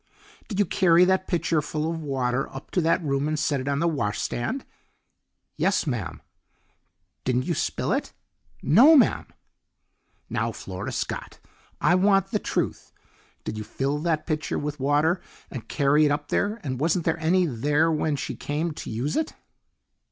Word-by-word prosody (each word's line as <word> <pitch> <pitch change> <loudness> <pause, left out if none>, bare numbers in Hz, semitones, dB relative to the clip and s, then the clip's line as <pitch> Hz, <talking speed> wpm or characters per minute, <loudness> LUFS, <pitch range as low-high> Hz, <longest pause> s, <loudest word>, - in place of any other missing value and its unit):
"Did 205 - -5
you 205 - +3
carry 175 -1 +4
that 190 0 +1
pitcherful 160 -3 0
of 165 0 -3
water 135 -3 -1
up 135 - -9
to 180 - +1
that 165 +1 +2
room 140 -1 0
and 155 0 -1
set 145 -2 0
it 130 - -7
on 140 -1 +1
the 170 +3 +1
washstand?" 120 - -2 0.9
"Yes, 195 - +1
ma'am." 120 - -4 1.0
"Didn't 125 0 0
you 175 - 0
spill - - -1
it?" - - -1 0.5
"No, 260 - +7
ma'am." 275 - +3 1.0
"Now, - - -1
Flora - - -6
Scott, - - -4 0.4
I - - +3
want 195 +1 +3
the 210 - +1
truth! - - -3 0.5
Did 110 - -4
you - - -4
fill 140 +6 -2
that 155 -1 -1
pitcher 155 -2 -2
with 145 0 -4
water 150 +6 +2 0.3
and 115 -5 -7
carry 145 +1 +3
it 145 - +2
up 145 0 -2
there, 210 +3 0
and 130 -4 -3
wasn't 165 +3 +1
there 165 +1 0
any 175 +3 +3
there 150 +4 +1
when 155 -1 0
she - - -4
came 155 +3 -2
to 150 - -7
use 120 +7 -2
it?" 315 0 -1
155 Hz, 165 wpm, -25 LUFS, 140-175 Hz, 1.0 s, No